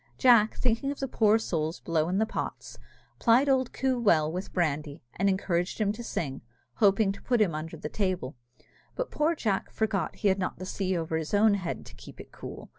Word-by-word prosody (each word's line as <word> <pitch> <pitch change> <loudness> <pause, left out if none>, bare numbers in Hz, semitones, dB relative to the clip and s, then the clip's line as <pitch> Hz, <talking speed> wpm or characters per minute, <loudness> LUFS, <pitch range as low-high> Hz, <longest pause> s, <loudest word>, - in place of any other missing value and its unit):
Jack, 235 -5 +5
thinking 250 +2 0
of 285 - -7
the 270 - -2
poor 220 -3 +3
souls 160 -7 -2
below 165 -1 0
in 185 - 0
the 220 - +3
pots, - - -6 0.4
plied 240 +5 +4
old 260 -2 +2
Coo 260 -2 0
well 160 -9 +3
with 180 +3 -5
brandy, 150 -4 -2
and 195 +2 +2
encouraged 180 -1 -1
him 205 -2 +2
to 225 +3 -7
sing, 140 - -4 0.4
hoping 200 0 +4
to 200 - -9
put 245 -2 +1
him 200 -6 +3
under 160 +2 -5
the 150 - -5
table, 185 -7 -2 0.6
but - - -3
poor 315 +3 +1
Jack 210 -9 -1
forgot 205 -6 -1
that - - -19
he 205 - +4
had 190 0 +1
not 185 - -2
the 185 - -7
sea 185 -1 -1
over 160 -1 -2
his 160 +5 -2
own 210 +1 +5
head 185 -4 -3
to - - -13
keep - - -13
it - - -11
cool. - - -9
195 Hz, 215 wpm, -28 LUFS, 165-225 Hz, 0.6 s, Jack